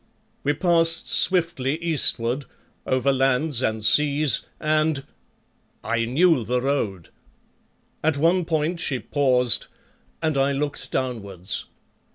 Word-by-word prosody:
We 145 - +1
passed 165 -1 +2
swiftly 165 -6 +3
eastward, 145 -5 +1 0.4
over 130 +1 +1
lands 135 +1 +1
and 110 -3 -2
seas, 150 +2 +3 0.2
and 155 -2 0 0.8
I 115 0 -1
knew 145 +2 +2
the 125 +3 -1
road. 115 - -2 0.9
At 155 -2 +1
one 170 +4 +2
point 160 +1 -1
she 140 -6 -1
paused 125 -3 +1 0.5
and 155 -3 -1
I 140 +1 +1
looked 145 +1 -4
downwards. 105 -6 -3
140 Hz, 110 wpm, -23 LUFS, 125-160 Hz, 0.9 s, swiftly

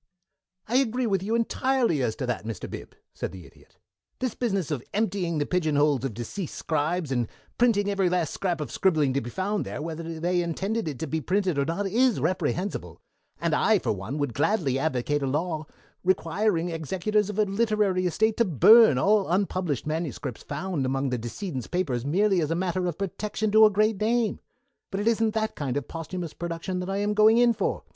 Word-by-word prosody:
"I 245 - +2
agree 255 -1 +1
with 195 -5 +1
you 215 +4 -1
entirely 235 - +1
as 110 -3 0
to 130 - -3
that, 120 -4 -2
Mr. 110 -1 -5
Bib," - - -9 0.2
said - - -4
the 90 -2 -10
Idiot. - - -20 0.4
"This 255 -3 -2
business 195 - -1
of 140 -5 -1
emptying 190 -6 0
the 145 - 0
pigeonholes 150 -6 +1
of 130 -6 -3
deceased 145 - -5
scribes, 155 0 -1
and 120 -3 0 0.3
printing 225 -4 +3
every 195 -2 +1
last 175 -4 0
scrap 175 -5 -2
of 140 -6 -5
scribbling 155 -8 +2
to 140 - 0
be 120 - -6
found 200 - -1
there, - - -6
whether 165 +1 -5
they 175 +2 +1
intended 190 +5 -2
it 145 -4 -4
to 160 - -3
be 160 +1 -2
printed 185 -3 0
or 140 - +2
not, 170 +6 -2
is 235 - +2
reprehensible, 160 - -2 0.4
and - - 0
I - - +4
for - - -1
one 105 +8 -4
would 145 -5 -1
gladly 145 - +1
advocate 145 0 0
a 135 - -1
law 155 +2 -2 0.4
requiring 180 0 +1
executors 190 +6 -1
of 210 - -5
a 215 - +4
literary 200 -3 +1
estate 220 +5 +1
to 235 - +4
burn 190 - +7
all 200 +7 +3
unpublished 180 - 0
manuscripts 155 -6 -4
found 180 -7 -3
among 135 +1 0
the 125 - -1
decedent's 130 - -5
papers 140 -9 -1
merely 190 +3 +2
as 150 - -1
a 165 - 0
matter 180 0 -1
of 170 - -3
protection 210 +2 -2
to 220 +1 +8
a - - +7
great 210 0 +1
name. 230 0 +1 0.5
But 195 - -3
it 210 - -1
isn't 225 -1 +2
that 220 0 0
kind 140 -2 -3
of 145 - -4
posthumous 165 0 -5
production 170 +2 -4
that 180 +1 -4
I 195 - -1
am 205 +1 0
going 215 +2 +5
in 240 -1 +5
for. - - -2
180 Hz, 200 wpm, -26 LUFS, 145-210 Hz, 0.5 s, to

